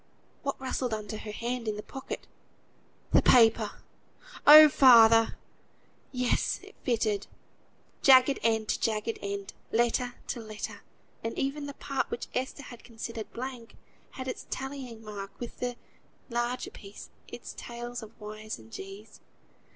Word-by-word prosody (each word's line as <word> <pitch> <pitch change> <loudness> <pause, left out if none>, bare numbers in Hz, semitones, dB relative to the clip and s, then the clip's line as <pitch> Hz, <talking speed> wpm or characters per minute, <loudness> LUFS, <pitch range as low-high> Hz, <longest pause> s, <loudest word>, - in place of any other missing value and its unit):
What 275 0 -3
rustled 255 -3 -2
under 215 0 -6
her 210 - -7
hand 235 +2 -3
in 215 - -1
the 210 - -6
pocket? 265 -1 -7 0.9
The - - +7
paper! 225 -3 +4 0.6
"Oh! 305 +1 +12
Father!" 230 -5 +7 0.7
Yes, 250 -1 0
it - - -13
fitted; 215 -5 0 0.7
jagged 265 0 +6
end 220 -1 +1
to - - +1
jagged 220 0 -1
end, 200 0 -5 0.2
letter 240 +2 +1
to - - -2
letter; 215 -1 -7 0.4
and 225 - -4
even 285 +2 -2
the 280 - -7
part 275 -1 -2
which - - -5
Esther 265 +3 -3
had 240 -2 -11
considered 230 -1 -7
blank 250 -2 -7 0.4
had 260 0 -6
its 255 - -5
tallying 265 -4 -6
mark 200 -2 -8
with 240 - -7
the 245 -1 -2 0.6
larger 240 +1 -2
piece, 200 0 -12 0.2
its - - -8
tails 240 0 -6
of 220 0 -12
_y_s 215 0 -7
and 110 -1 -16
_g_s. 200 - -10
235 Hz, 140 wpm, -29 LUFS, 215-255 Hz, 0.9 s, Oh